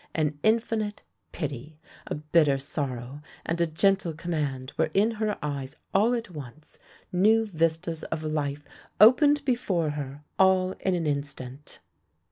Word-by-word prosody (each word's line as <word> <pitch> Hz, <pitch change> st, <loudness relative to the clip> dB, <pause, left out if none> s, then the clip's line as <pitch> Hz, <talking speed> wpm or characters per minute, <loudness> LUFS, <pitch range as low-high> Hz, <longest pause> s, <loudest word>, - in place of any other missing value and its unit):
An 150 Hz, -2 st, 0 dB
infinite 220 Hz, 0 st, 0 dB, 0.3 s
pity, 150 Hz, -1 st, -6 dB, 0.3 s
a -, -, -2 dB
bitter 150 Hz, -1 st, +3 dB
sorrow, 135 Hz, -1 st, -4 dB, 0.2 s
and 170 Hz, +1 st, -1 dB
a 170 Hz, -, +3 dB
gentle 180 Hz, +2 st, +2 dB
command 145 Hz, -6 st, -3 dB
were -, -, +1 dB
in 210 Hz, +4 st, +4 dB
her 215 Hz, -2 st, -2 dB
eyes 140 Hz, -1 st, -4 dB, 0.2 s
all 225 Hz, +5 st, +4 dB
at 230 Hz, -4 st, -5 dB
once 150 Hz, -1 st, -10 dB, 0.2 s
— -, -, -29 dB
new 215 Hz, +5 st, +4 dB
vistas 165 Hz, -3 st, -1 dB
of 160 Hz, -1 st, -4 dB
life 145 Hz, -2 st, -2 dB, 0.3 s
opened 285 Hz, +7 st, +6 dB
before 190 Hz, -, 0 dB
her, 145 Hz, 0 st, -6 dB, 0.2 s
all 190 Hz, -1 st, +4 dB
in 190 Hz, -1 st, 0 dB
an 170 Hz, -2 st, -1 dB
instant. 140 Hz, -2 st, -4 dB
160 Hz, 140 wpm, -27 LUFS, 145-195 Hz, 0.3 s, opened